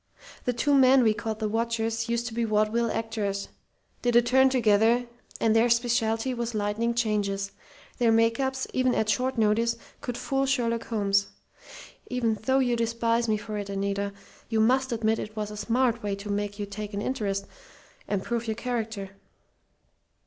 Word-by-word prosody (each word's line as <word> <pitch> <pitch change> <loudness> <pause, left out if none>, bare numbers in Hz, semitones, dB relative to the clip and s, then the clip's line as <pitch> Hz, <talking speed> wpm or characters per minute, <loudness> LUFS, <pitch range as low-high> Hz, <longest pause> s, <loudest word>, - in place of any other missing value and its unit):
The 250 - +2
two 285 +5 +1
men 265 -1 +6
we 220 -2 +4
called 220 0 -4
the 215 -1 -1
'watchers' 225 +1 -1
used 235 0 0
to 240 - -5
be 235 +1 -1
vaudeville 215 +2 +1
actors 215 -3 -2 0.5
did 240 -1 +1
a 240 - +8
turn 265 +2 +4
together, 230 -1 +3 0.3
and 225 -1 +2
their 230 +2 +4
specialty 235 0 +1
was 235 -1 -3
lightning 215 +3 0
changes. 200 -3 0 0.5
Their 235 -2 +4
make 230 +1 +3
ups, 265 -1 -1
even 255 -1 +2
at 220 - 0
short 255 +5 0
notice, 230 +2 +2 0.2
could 245 -1 -4
fool 270 0 0
Sherlock 235 -4 0
Holmes. 200 -3 +1 0.8
Even 240 -3 0
though 265 0 +4
you 250 -3 +2
despise 230 0 0
me 215 - +2
for 210 0 -5
it, 200 -1 -6
Anita, 200 0 -2 0.4
you 225 -1 +1
must 260 +4 +3
admit 225 -1 +1
it 215 0 -6
was 210 -1 -3
a - - -7
smart 235 +2 +1
way 205 -1 -2
to 200 +1 -6
make 205 0 -2
you 205 - -3
take 205 +1 -6
an 200 - -2
interest, 200 -6 -2 0.6
and 200 -2 -1
prove 235 -1 -2
your 220 - -1
character. 225 -5 -3
225 Hz, 175 wpm, -27 LUFS, 210-240 Hz, 0.8 s, a